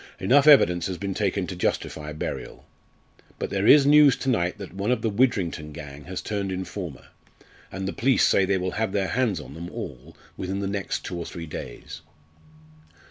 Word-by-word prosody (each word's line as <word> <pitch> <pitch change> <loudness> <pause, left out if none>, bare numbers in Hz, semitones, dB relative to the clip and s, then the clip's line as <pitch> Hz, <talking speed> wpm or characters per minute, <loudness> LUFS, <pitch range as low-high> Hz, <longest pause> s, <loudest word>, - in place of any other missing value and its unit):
Enough 135 +9 +4
evidence 90 - +6
has 95 -2 -4
been 100 0 -3
taken 100 -1 -1
to 90 - -6
justify 75 -3 -2
burial. 75 - -6 0.7
But - - -4
there 100 +1 0
is 145 -2 +8
news 145 -1 +7
to 135 - -3
night 90 -5 0
that 100 -3 -9
one 100 +3 -2
of 125 - +1
the 110 - +1
Widrington 95 -9 0
gang 75 -2 -9
has 95 0 -5
turned 100 -2 -3
informer, 90 -4 -6 0.6
and 95 0 -4
the - - -3
police 130 +1 +3
say 95 - +4
they 95 0 +1
will 95 0 -2
have 110 -4 0
their 95 -3 0
hands 110 -4 0
on 75 - -10
them 85 +3 -7
all 75 +3 -8 0.2
within 95 +1 -3
the 100 - -2
next 100 -1 -3
two 90 - -4
or 85 - -5
three 85 -1 -7
days." 75 -5 -8
95 Hz, 190 wpm, -25 LUFS, 85-105 Hz, 0.7 s, is